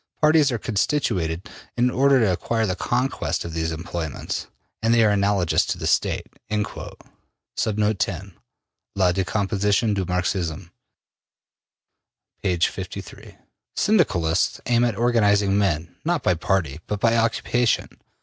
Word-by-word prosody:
Parties 150 -2 +4
are 120 - -1
constituted 100 - -1 0.3
in 125 +1 +3
order 135 +1 +4
to 110 -5 +3
acquire 110 +6 -1
the 95 -3 -1
conquest 125 0 -1
of 85 - -6
these 80 0 -1
employments, 80 -2 -4 0.3
and 115 +1 +2
they 115 - +5
are 105 - +4
analogous 100 -3 +2
to - - -2
the - - -5
State.'' - - +1 0.2
La 105 -1 -3 2.2
Decomposition 100 +4 +1
du 100 -1 -1
Marxisme,'' 90 -1 -2 1.7
p. 90 -3 0
53. 85 - -4 0.4
Syndicalists 95 - +2
aim 120 -1 +3
at 120 -3 +1
organizing 105 -4 +3
men, 85 -5 0
not 170 -3 0
by 90 - +3
party, 80 -4 -1
but 105 - -2
by 115 +2 +3
occupation. 115 +1 +1
100 Hz, 120 wpm, -23 LUFS, 90-120 Hz, 2.2 s, they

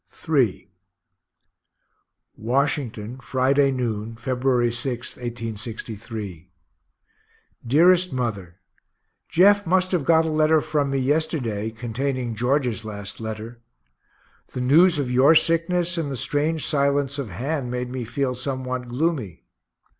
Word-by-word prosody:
III 135 -11 +1 1.7
Washington, 125 -1 -1
Friday 135 +2 +2
noon, 115 -3 -3
February 125 0 0
6, 120 0 -3
1863. 110 -5 -6 1.2
DEAREST 175 +7 +4
MOTHER 105 -9 -3 0.7
Jeff 205 +2 +4
must 185 +1 +2
have 175 -6 +1
got 160 +2 +4
a 160 - -1
letter 155 +1 +3
from 150 -2 -1
me 135 - -1
yesterday, 130 -6 -1
containing 120 +2 -3
George's 125 0 0
last 100 -2 -7
letter. 110 +1 -7 0.9
The 125 - -3
news 160 +7 +5
of 135 -4 -2
your 135 +6 +5
sickness 170 +2 +2
and 145 -4 -3
the 135 - -4
strange 150 +6 0
silence 140 -1 +1
of 130 -6 -4
Han 130 - -3
made 125 0 -3
me 130 -1 -4
feel 130 +3 -2
somewhat 130 -1 -4
gloomy. 125 - -2
130 Hz, 115 wpm, -23 LUFS, 115-150 Hz, 1.7 s, news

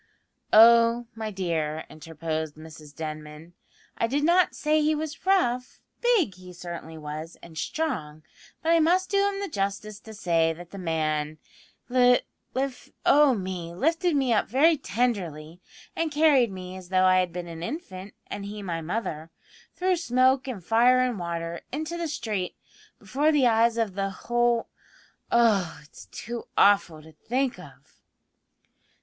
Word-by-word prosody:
"Oh, 230 +1 +6
my 220 -1 -5
dear," 160 -5 -2
interposed 160 -1 -5
Mrs 155 -1 -13
Denman, 155 +1 -7 0.5
"I 230 - +2
did 285 +5 -1
not 350 +3 +3
say 305 +1 +1
he 305 +1 +2
was 315 +3 -6
rough. 250 -10 +1 0.2
Big 460 - +3
he 180 0 -13
certainly 170 -2 -8
was, 155 +2 -7
and 165 -1 -12
strong, 155 - -3 0.4
but 325 - +2
I 335 - +5
must 360 +4 +2
do 400 0 +3
him 395 0 -5
the 400 - -3
justice 205 - -3
to 220 0 -12
say 165 -5 +1
that 175 +1 -12
the 200 - -8
man 155 -3 -1 0.5
li 245 0 +4 0.3
lif 265 -1 -3 0.2
oh 290 -3 +5
me! 185 -4 -5
lifted 330 - +1
me 265 -4 +2
up 210 - +1
very 300 +8 +4
tenderly, 180 - -2 0.3
and 330 -1 -1
carried 290 -6 +4
me 185 -1 -8
as 185 -1 -10
though 185 0 +3
I 185 0 +5
had 180 -1 0
been 175 0 -6
an 165 -1 -8
infant 190 - -7
and 205 - -6
he 205 0 -7
my 170 -3 -3
mother, 165 -3 -4 0.5
through 365 0 +1
smoke 260 -2 +2
and 225 -9 -5
fire 240 +4 +4
and 250 -5 -1
water, 170 -1 -4
into 315 +5 -4
the 340 -1 -3
street, 215 - -3 0.4
before 295 +4 +1
the 290 -4 +3
eyes 230 0 +3
of 225 -4 0
the 195 0 -2
whole 240 +4 0 0.6
oh, 215 -7 +3
it's 145 - -14
too 235 +1 -7
awful 195 -6 +4
to 160 - -14
think 250 - -2
of!" - - -16
210 Hz, 155 wpm, -26 LUFS, 170-265 Hz, 0.6 s, Oh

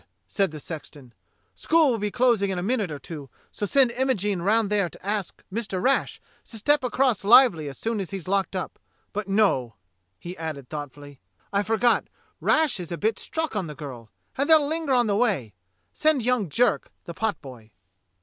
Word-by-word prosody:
said 195 -2 0
the 155 -1 -8
sexton. 145 -5 -9 0.4
"School 320 -4 +3
will 230 - -1
be 210 0 -1
closing 235 -4 +2
in 190 - -2
a 175 - -2
minute 215 -4 0
or 150 - -4
two, 145 -2 -9 0.2
so 205 - -3
send 265 +1 +4
Imogene 220 -7 0
round 210 +2 +2
there 200 -4 +2
to - - -16
ask 205 -3 -3
Mr. 200 -4 -2
Rash 265 +8 +1 0.3
to 225 - -8
step 290 +6 +2
across 250 -3 +1
lively 200 - +6
as 135 - -9
soon 225 -1 -2
as 190 - -4
he's 190 -3 -6
locked 195 0 0
up. 185 - -4 0.3
But 210 -1 -3
no" 195 - +1 0.2
— 90 0 -49
he 175 +1 -7
added 155 -5 -6
thoughtfully 145 -2 -8 0.2
— - - -38
"I 200 - +3
forgot: 225 +3 +2 0.3
Rash 310 -9 +2
is 175 -2 -7
a 170 - -3
bit 220 +4 0
struck 320 -6 -3
on 190 -5 -1
the 150 - -8
girl 130 -6 -9 0.3
and 280 - +1
they'll 310 -3 +6
linger 315 -2 -1
on 245 -1 +3
the 205 -2 +1
way; 200 - 0 0.4
send 305 -5 +2
young 240 -6 +1
Jerk, 235 +5 +1
the 170 - -7
potboy." 135 - -4
200 Hz, 195 wpm, -25 LUFS, 160-240 Hz, 0.4 s, lively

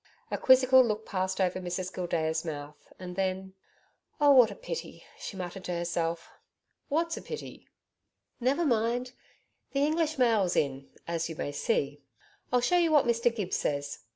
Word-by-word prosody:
A - - 0
quizzical 260 0 +6
look 220 -2 -2
passed 190 -1 -2
over 185 -1 +1
Mrs 180 +1 -4
Gildea's 160 -3 -1
mouth, 150 -2 -8
and 180 -1 -8
then, 190 0 -2 0.7
'Oh, 290 -1 +6
what 250 -5 +7
a 200 - -8
pity!' 165 -1 -7 0.2
she 195 - -7
muttered 185 +1 -6
to 180 - -2
herself. 170 -1 -2 0.6
'What's 330 +3 0
a - - -6
pity?' 460 - -8 0.7
'Never 270 +7 +1
mind! 240 0 +1 0.6
The 280 +1 +2
English 315 0 0
mail's 220 -8 +3
in 135 -2 -1 0.2
as 165 -1 -2
you 160 - -6
may 145 - -3
see. 145 0 -1 0.5
I'll 250 0 +3
show 355 +9 +3
you 335 -2 +2
what 295 -3 +5
Mr 235 0 +2
Gibbs 200 -5 -2
says. 140 -1 -2
190 Hz, 160 wpm, -29 LUFS, 170-255 Hz, 0.7 s, what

